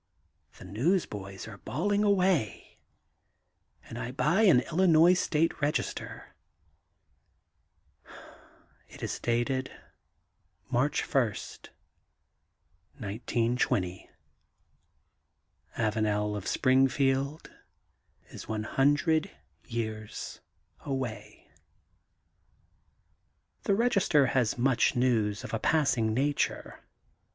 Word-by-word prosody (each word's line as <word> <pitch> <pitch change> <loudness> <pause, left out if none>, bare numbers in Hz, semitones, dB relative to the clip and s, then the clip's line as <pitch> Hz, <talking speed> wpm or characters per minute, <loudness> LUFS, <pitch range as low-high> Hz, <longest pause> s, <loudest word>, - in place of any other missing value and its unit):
The - - -12
newsboys 105 - -2
are 105 -2 -10
bawling 200 - -1
away, 185 - 0 1.0
and - - -9
I - - -4
buy 150 - +1
an 185 - +6
Illinois 170 +1 +4
State 165 -3 0
Register. 145 +1 -3 2.6
It - - -12
is - - -3
dated 120 +3 -1 1.0
March 135 +4 +1
1, 135 - +2 1.7
1920. 115 -3 -1 1.7
Avanel 105 -1 0
of 100 -2 -5
Springfield 135 +2 +1 0.8
is - - -9
one 110 -1 -3
hundred 145 - +2 0.4
years 110 -3 -5 0.4
away. 110 -7 -6 2.2
The 200 - +3
Register 195 - +3
has 125 -3 +1
much 125 0 +2
news 115 -5 +1
of - - -8
a 115 - 0
passing 130 -8 +2
nature. 145 +3 -1
130 Hz, 75 wpm, -29 LUFS, 110-155 Hz, 2.6 s, an